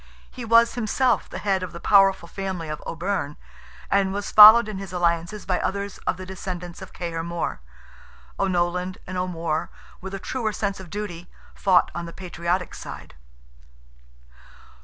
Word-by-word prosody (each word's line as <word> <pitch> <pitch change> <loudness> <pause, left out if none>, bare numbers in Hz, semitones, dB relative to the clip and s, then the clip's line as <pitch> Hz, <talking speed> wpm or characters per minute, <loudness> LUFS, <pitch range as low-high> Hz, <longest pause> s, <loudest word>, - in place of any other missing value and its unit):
He 250 - -8
was 230 +1 +5
himself 245 +2 +1
the - - -6
head 195 -2 0
of 185 -1 -6
the 170 - -7
powerful 195 -2 +4
family 185 -4 -5
of 150 -1 -5
O'Byrne, 165 -4 -3 0.5
and 195 -1 +3
was 200 +1 -4
followed 215 +2 +10
in 210 -3 -5
his 195 -2 -7
alliances 175 +3 -1
by 185 -2 0
others 200 0 -3
of - - +1
the 185 - -8
descendants 180 -2 -7
of - - -9
Cahir 170 -2 -4
More. 170 - -4 0.8
O'Nolan 180 -1 0
and 185 - -7
O'More, 170 -4 -2 0.3
with 190 +1 -6
a - - -5
truer 220 0 -3
sense 200 -2 -2
of 185 -2 -10
duty, 180 -3 -6 0.2
fought 185 -2 +3
on 170 0 -5
the 170 - -9
patriotic 180 0 -3
side. - - -9
185 Hz, 160 wpm, -24 LUFS, 175-200 Hz, 0.8 s, followed